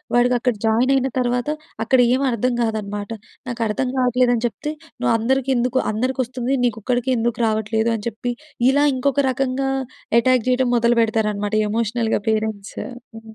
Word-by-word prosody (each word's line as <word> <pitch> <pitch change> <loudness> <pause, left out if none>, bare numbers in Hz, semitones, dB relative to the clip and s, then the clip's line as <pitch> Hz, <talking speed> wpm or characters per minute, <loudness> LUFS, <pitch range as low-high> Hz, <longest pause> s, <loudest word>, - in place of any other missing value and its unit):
వాడికక్కడ 245 0 +2
జాయినయిన 255 +4 +3
తర్వాత, 245 +2 0 0.4
అక్కడ 260 +1 +3 0.2
ఏవర్థం 255 -2 0
గాదనమాట. 210 -2 -3 0.4
నాకర్థం 230 +1 -1
గావట్లేదని 245 -1 +2
చెప్తే, 295 +8 -5 0.3
నువ్వందరికెందుకు 255 +2 +1 0.2
అందరికొస్తుంది, 255 +2 -1
నీకొక్కడికే 245 +3 -1
ఎందుకు 235 +1 -1
రావట్లేదు 220 +1 0
అని 205 - -6
చెప్పి, 240 +2 -4 0.4
ఇలా 285 +2 +3
ఇంకొక 275 +2 0
రకంగా 270 +1 -1 0.5
ఎటాక్ 250 -1 +2
జెయటం 255 0 +2
మొదలుపెడతారనమాట 220 -3 +1 0.2
ఎమోషనల్‌గా 225 0 0
పేరెంట్స్. 215 -2 -2 0.4
ఆ! - - -7
240 Hz, 110 wpm, -21 LUFS, 220-255 Hz, 0.5 s, జాయినయిన